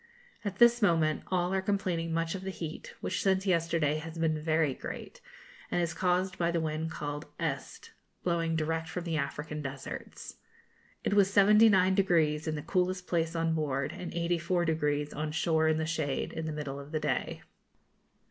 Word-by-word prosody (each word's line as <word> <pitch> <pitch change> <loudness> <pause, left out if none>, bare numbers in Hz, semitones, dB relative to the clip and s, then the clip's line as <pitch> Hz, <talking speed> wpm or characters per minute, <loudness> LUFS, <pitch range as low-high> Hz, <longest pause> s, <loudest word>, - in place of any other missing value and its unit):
At 200 -2 -3
this 240 +1 +6
moment 165 -6 +3
all 180 0 0
are 190 - +1
complaining 185 -4 -1
much 165 0 0
of 190 - -5
the 190 - -4
heat, 165 -4 -7
which - - -2
since 190 0 +2
yesterday 165 -4 +1
has 165 +1 -8
been 160 -2 0
very 155 -2 +2
great, - - -8 0.5
and - - 0
is 170 -1 0
caused 185 +1 0
by 170 -1 +2
the 170 0 +1
wind 160 0 -2
called 145 -2 -5
'Este,' 145 -5 -4 0.3
blowing 165 -2 0
direct 160 +1 -1
from 180 - -4
the 165 -2 -1
African 150 +1 -3
deserts. 135 -1 -7 0.7
It - - 0
was 200 -2 +5
79° 190 -6 +4
in 155 - 0
the 150 - -5
coolest 185 +1 0
place 165 -2 0
on 165 0 +1
board, 140 -4 -1
and 180 - -6
84° 165 -4 0
on 150 +1 -2
shore 160 0 +2
in 160 0 +3
the 160 - -1
shade, 150 -4 -2
in 160 0 -4
the - - -2
middle 145 -2 -4
of 140 +1 -10
the 155 - 0
day. 150 -4 -2
165 Hz, 175 wpm, -30 LUFS, 155-180 Hz, 0.7 s, this